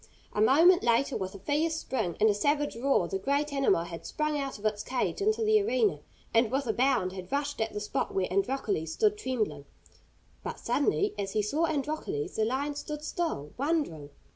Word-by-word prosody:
A 210 - 0
moment 330 +10 +6
later, 240 +3 +2
with 190 +1 -4
a - - -6
fierce 300 - 0
spring 220 - -2
and 215 - +5
a 210 - +4
savage 290 +7 0
roar, 235 -7 +2
the 190 +2 -3
great 285 +6 0
animal 275 -11 +2
had 170 -1 -8
sprung 305 -1 -1
out 275 -4 -3
of 210 - -11
its 210 -1 0
cage 255 +9 -2
into 435 +2 +2
the 430 -1 +4
arena, 225 - +1 0.3
and 230 0 +4
with 270 +3 0
a 220 - 0
bound 250 -8 +2
had 185 -1 -8
rushed 285 -2 -1
at 220 - 0
the 210 - -4
spot 210 - -2
where 190 -1 0
Androcles 195 -6 0
stood 425 -1 +2
trembling. 215 - -2 0.8
But - - -5
suddenly, 210 - +1
as 195 -1 -3
he 215 - +1
saw 295 +11 +1
Androcles, 315 +8 -3
the 220 - +2
lion 275 +5 -1
stood 300 +1 -6
still, 310 - -3
wondering. 280 - -1
260 Hz, 195 wpm, -29 LUFS, 205-295 Hz, 0.8 s, moment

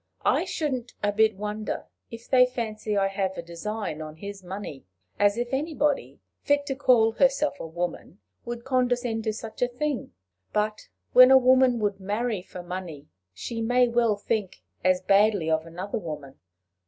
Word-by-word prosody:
I - - +3
shouldn't 260 -6 -3
a 205 - +2
bit 220 0 +3
wonder 210 +1 -4 0.2
if 230 0 -10
they 250 -1 +5
fancy 220 -4 -3
I 195 -1 +3
have 195 -1 -2
a - - -4
design 170 0 -5
on 155 0 -7
his 200 +3 -8
money 185 -7 -7 0.4
as 205 +1 +3
if 240 +2 -3
anybody 295 0 -1 0.2
fit 285 0 +1
to 270 - -2
call 245 -5 +4
herself 275 +4 +2
a - - -5
woman 175 +2 -5 0.3
would 235 0 -6
condescend 245 -3 0
to 220 - +1
such 220 0 -8
a 245 - +4
thing! 250 - -3 0.4
But 210 0 -1 0.3
when 255 0 +9
a 265 - +9
woman 255 -1 +5
would 205 -2 0
marry 210 +1 -2
for 180 0 -10
money, 175 -5 -7 0.3
she 230 - -5
may 245 +2 +3
well 235 -2 +2
think 205 -2 -3 0.2
as 185 0 +3
badly 200 -3 +3
of 160 +1 0
another 180 +6 -4
woman." 150 -7 -8
215 Hz, 165 wpm, -26 LUFS, 190-245 Hz, 0.4 s, when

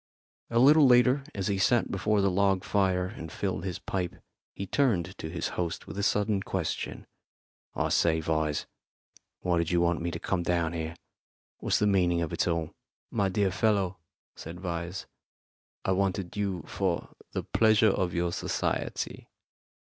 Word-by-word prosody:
A 115 - 0
little 145 +4 +7
later, 125 +2 +5
as 100 -2 -2
he 100 -2 0
sat 120 +4 +3
before 105 +1 +1
the 100 -1 +2
log 95 0 +2
fire 95 -3 +1
and 80 -3 -7
filled 80 - -2
his 90 -3 -3
pipe, 90 -3 -3 0.4
he 100 - -4
turned 95 -8 +1
to 80 - -5
his - - -3
host 85 -2 -3
with - - -8
a 100 - -2
sudden 105 0 +1
question: 95 -4 -3 0.7
"I - - 0
say, 80 -1 +3
Vyse, 80 -1 0 0.8
why 90 -2 +1
did 85 -1 0
you 90 - +2
want 85 -1 +1
me 85 - -1
to - - -5
come 95 -2 -1
down 85 -1 0
here? 80 0 -4 0.6
What's - - +1
the 105 - +2
meaning 90 -4 +3
of 80 - -4
it - - 0
all?" 85 -2 -1 0.4
"My 100 -4 +1
dear 95 0 +1
fellow," 100 -2 +1 0.4
said 85 +2 -8
Vyse, 85 0 -4 0.8
"I - - +2
wanted 95 -1 0
you 100 -5 -2
for 95 -4 -2 0.2
the - - -2
pleasure 110 -1 +4
of 90 -2 0
your 85 0 0
society. - - -2
95 Hz, 165 wpm, -29 LUFS, 85-100 Hz, 0.8 s, little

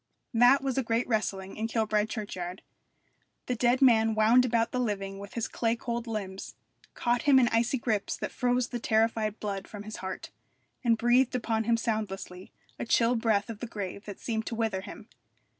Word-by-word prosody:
That 245 +4 +5
was 270 -1 0
a - - 0
great 230 +1 0
wrestling 195 -4 -2
in 220 +1 -1
Kilbride 215 -2 0
churchyard. 185 -4 -5 0.8
The 250 - -1
dead 245 +2 +2
man 225 -3 +5
wound 225 +4 +5
about 230 -2 +1
the 255 - -1
living 195 -4 -2
with 200 0 -10
his 230 -2 -1
clay 230 -1 0
cold 235 0 -4
limbs, 195 -4 -5 0.4
caught 240 0 +1
him 280 -2 +5
in 250 -2 +5
icy 235 +3 +1
grips 220 -4 -1
that - - -4
froze 250 -1 0
the 240 - -4
terrified 220 -1 +1
blood 200 -2 -4
from 205 -1 -8
his 215 +1 -7
heart, 190 0 -6 0.5
and 230 -2 +3
breathed 245 +2 +3
upon 225 -2 -1
him 230 0 +3
soundlessly 195 -5 -4 0.3
a - - -3
chill 230 +1 +3
breath 220 -3 +1
of 225 -3 -7
the 240 - -5
grave 200 -2 -6
that 205 -2 -8
seemed 220 -2 -3
to 230 - -3
wither 220 -4 -1
him. 210 +3 -10
225 Hz, 190 wpm, -29 LUFS, 210-240 Hz, 0.8 s, That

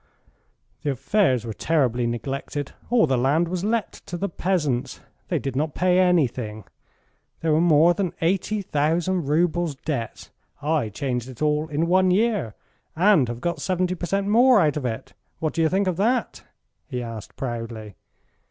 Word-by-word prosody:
"The 145 - -2
affairs 135 - +1
were 115 - -4
terribly 125 -5 +1
neglected. 135 +4 -4 0.2
All 240 -4 +4
the 130 -4 +1
land 145 +7 +2
was 180 +1 -3
let 220 +1 0 0.2
to 175 - -4
the 200 +3 -2
peasants. 160 -9 -1 0.3
They - - 0
did 135 -2 -4
not 150 +2 -1
pay 180 0 +3
anything. 125 - +1 0.8
There 160 -1 +2
were 155 - +3
more 170 0 +5
than 180 -1 -2
eighty 195 +4 0
thousand 165 +2 0
roubles 170 0 +1
debts. 135 -5 -5 0.3
I 150 -6 0
changed 125 +3 -3
it 130 +3 -6
all 150 +1 +1
in 155 +1 0
one 185 +2 +3
year, 200 - +1 0.4
and 175 -6 +4
have 120 +1 -6
got 170 -3 -2
70 185 +1 0
per 175 -1 -5
cent. 195 +2 0
more 240 +2 +6
out 150 -5 +2
of 140 -4 -2
it. 110 -2 -6 0.2
What 155 -1 -2
do 165 - 0
you 160 - +3
think 195 +3 +1
of 185 -3 -1
that?" 235 +6 0 0.4
he 125 -4 -4
asked 115 -3 -8
proudly. 115 -4 -5
160 Hz, 170 wpm, -24 LUFS, 130-185 Hz, 0.8 s, more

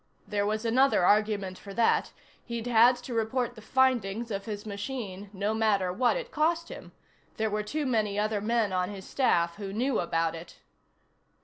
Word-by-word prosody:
There 205 -1 0
was 215 +2 -2
another 250 -4 +3
argument 205 -2 +2
for 200 -1 -10
that: 230 +1 +2 0.3
he'd 235 -1 -5
had 240 +1 +5
to 245 0 -8
report 235 +2 -1
the 220 - -12
findings 235 -3 +1
of 200 -1 -3
his 210 -2 -6
machine 205 -2 -5
no 205 +2 -1
matter 205 -5 +1
what 245 - +2
it - - -6
cost 335 +2 0
him; - - -10 0.5
there 220 -1 0
were 210 0 0
too 295 +8 -3
many 215 -5 0
other 210 0 0
men 220 -2 +1
on 180 0 0
his 195 -2 -8
staff 170 -10 +1
who 200 -2 -5
knew 245 +5 0
about 165 -1 0
it. 165 +1 -10
215 Hz, 180 wpm, -28 LUFS, 200-245 Hz, 0.5 s, had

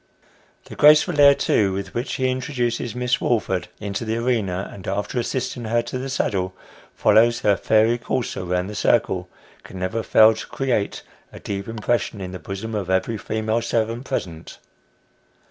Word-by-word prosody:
The - - -10
graceful 150 +1 +5
air, 140 0 +8
too, 100 -7 +1
with 100 +1 -5
which 120 +3 -3
he 130 - 0
introduces 120 -3 -2
Miss 125 -1 0
Woolford 95 -6 0
into 100 +1 -4
the 110 0 -2
arena, 110 -6 -1
and, 95 - -10
after 105 +5 -2
assisting 120 0 -3
her 120 +1 +1
to 125 +2 -5
the 135 +1 -5
saddle, 95 -7 -1 0.4
follows 120 +2 +4
her 100 -1 +3
fairy 110 +4 +2
courser 120 -5 -3
round 90 +1 -1
the 105 - -6
circle, 95 -5 +1 0.3
can 95 - -11
never 95 +5 -2
fail 110 0 +6
to 110 - -8
create 125 -7 -2 0.3
a - - -11
deep 100 -1 -5
impression 115 -1 -1
in 90 -1 -6
the 90 - -7
bosom 100 +5 -6
of 100 -4 -3
every 95 +4 0
female 110 +2 -1
servant 115 +2 -1
present. 85 -12 -5
110 Hz, 165 wpm, -22 LUFS, 100-120 Hz, 0.4 s, air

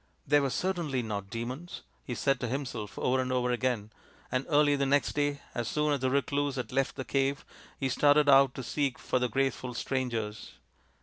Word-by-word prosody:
" - - -39
They 145 +1 +5
were 140 -1 0
certainly 155 -4 -1
not 100 -3 -4
demons," 125 - -6 0.2
he 125 - -4
said 135 0 +1
to 125 - -2
himself 120 -5 -4
over 130 +1 +1
and 130 0 -2
over 125 -1 +1
again; 120 -4 -1 0.4
and 130 +1 -1
early 145 -1 +4
the 140 -1 0
next 140 +1 +2
day, 145 -1 0
as 120 -2 -2
soon 150 -1 +1
as 140 - 0
the 130 0 +1
recluse 140 +1 0
had 125 -4 -4
left 135 +1 0
the 130 - -5
cave, 135 0 0 0.3
he 135 - 0
started 145 +3 +4
out 135 -1 +6
to 130 - -5
seek 140 0 -1
for 130 - -1
the 125 0 0
graceful 130 0 -1
strangers. 115 -5 -3
135 Hz, 200 wpm, -30 LUFS, 125-145 Hz, 0.4 s, out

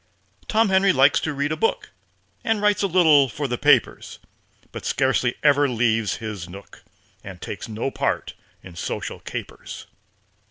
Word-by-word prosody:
Tom 220 -1 +2
Henry 190 +1 +4
likes 135 -1 +4
to 160 - -3
read 145 +1 -2
a - - 0
book, 225 +8 -1 0.5
And 225 -1 0
writes 210 0 +2
a 200 - +2
little 160 -7 +5
for 140 +6 -4
the 120 -2 -3
papers, - - +2 0.5
But - - -8
scarcely 130 -2 +1
ever 145 -1 +4
leaves 115 -3 +1
his 105 -6 -7
nook, 100 +3 -13 0.4
And 95 -2 -10
takes 105 - -7
no 110 +5 -3
part - - -2 0.3
in 90 -2 -12
social - - -5
capers. - - -8
135 Hz, 155 wpm, -23 LUFS, 110-165 Hz, 0.5 s, little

